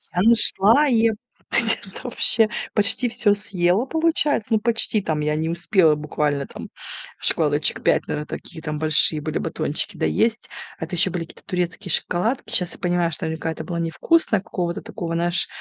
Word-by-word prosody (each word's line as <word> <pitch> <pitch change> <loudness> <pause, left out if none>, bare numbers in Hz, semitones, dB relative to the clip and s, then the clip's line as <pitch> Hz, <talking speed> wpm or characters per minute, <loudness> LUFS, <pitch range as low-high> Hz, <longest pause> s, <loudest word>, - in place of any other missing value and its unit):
Я 180 - +2
нашла 230 +4 +5
и 230 -3 +3 0.4
где-то 225 -4 +1
вообще 230 -2 +3 0.3
почти 220 +4 +2
всё 230 -3 +2
съела, 200 0 0
получается. 315 -5 0
Ну, 220 - +4
почти, 225 -1 +1
там, 155 -5 -2
я 150 0 0
не 160 +1 -2
успела 170 -2 +2
буквально, 150 -2 -2
там, - - -10 0.5
шоколадочек 150 -2 +1
5, - - +2
наверное, 150 0 -3
такие, 165 -2 -8
там, 150 -1 -4
большие 155 0 +4
были 155 +1 -3
батончики - - -3
доесть. 220 - 0 0.3
Это 180 - -5
еще 180 +2 +4
были 170 -1 -3
какие-то - - -17
турецкие 180 -2 -3
шоколадки. 220 +6 -1
Сейчас 180 -6 0
я - - -13
понимаю, 175 -2 0
что 160 - -4
наверняка 160 0 -3
это - - -7
было 175 -2 -4
невкусно, 200 - +1
какого-то 175 -2 -4
такого, 165 -2 -6
знаешь, 170 +1 0
180 Hz, 165 wpm, -22 LUFS, 160-225 Hz, 0.5 s, нашла